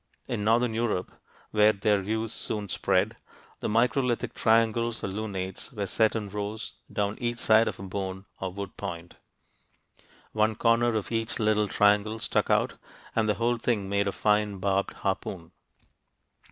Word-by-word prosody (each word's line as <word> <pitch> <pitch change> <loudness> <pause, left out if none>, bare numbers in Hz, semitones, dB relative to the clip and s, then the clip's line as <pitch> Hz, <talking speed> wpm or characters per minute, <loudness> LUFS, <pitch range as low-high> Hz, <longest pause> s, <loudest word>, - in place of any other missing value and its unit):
In 105 - -2
northern 115 +2 +3
Europe, 110 -5 -1 0.4
where 105 0 +5
their 100 0 +2
use 110 +3 -2
soon 105 -2 -3
spread, - - +1 0.4
the - - -2
microlithic 120 +2 +1
triangles 115 +1 +2
or - - 0
lunates 95 -2 -5
were 105 -5 -3
set 110 +3 +2
in 105 -2 -2
rows 105 +2 -4 0.2
down 105 0 -1
each 120 0 -1
side 110 0 +4
of - - -4
a - - -7
bone 95 0 -4
or 95 -1 -3
wood 100 0 -6
point. 85 -3 -6 1.1
One 110 0 +2
corner 115 +1 +3
of 110 0 -2
each 115 0 -1
little 105 -1 +2
triangle 105 +2 +3
stuck - - 0
out, - - +1 0.4
and 110 -1 +2
the 105 - +2
whole 120 +1 +1
thing 110 -4 -1
made 100 0 +1
a - - +1
fine 105 0 +1
barbed 100 +1 0
harpoon. 95 -3 -3
105 Hz, 155 wpm, -28 LUFS, 100-115 Hz, 1.1 s, where